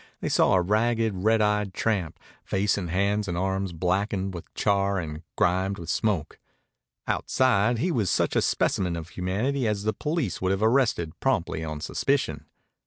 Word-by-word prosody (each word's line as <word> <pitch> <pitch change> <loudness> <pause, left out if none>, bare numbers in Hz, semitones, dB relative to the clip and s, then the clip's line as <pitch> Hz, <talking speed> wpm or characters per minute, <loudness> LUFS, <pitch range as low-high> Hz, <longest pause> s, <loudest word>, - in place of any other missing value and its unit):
They - - -2
saw - - +4
a 90 - +4
ragged, 110 +3 +1
red 110 +3 +3
eyed 105 -2 0
tramp, 95 -8 -1 0.2
face 100 +1 +1
and 90 -4 -4
hands 100 +4 +1
and 90 -2 -2
arms 95 0 -1
blackened 95 +3 -1
with 85 - -9
char 100 -1 +1
and 80 -3 -4
grimed 95 +2 +1
with 85 - -4
smoke. 100 -9 -1 0.7
Outside, 120 -2 +2
he 175 +10 0
was 110 - 0
such - - +1
a - - +4
specimen 90 -3 +1
of 85 0 -6
humanity 110 +10 -1
as 105 -2 -1
the 110 0 0
police 150 - -2
would 95 +1 +1
have 95 +2 -1
arrested 110 - +1
promptly 80 - 0
on 75 -1 -5
suspicion. 80 - -1
100 Hz, 170 wpm, -26 LUFS, 90-110 Hz, 0.7 s, saw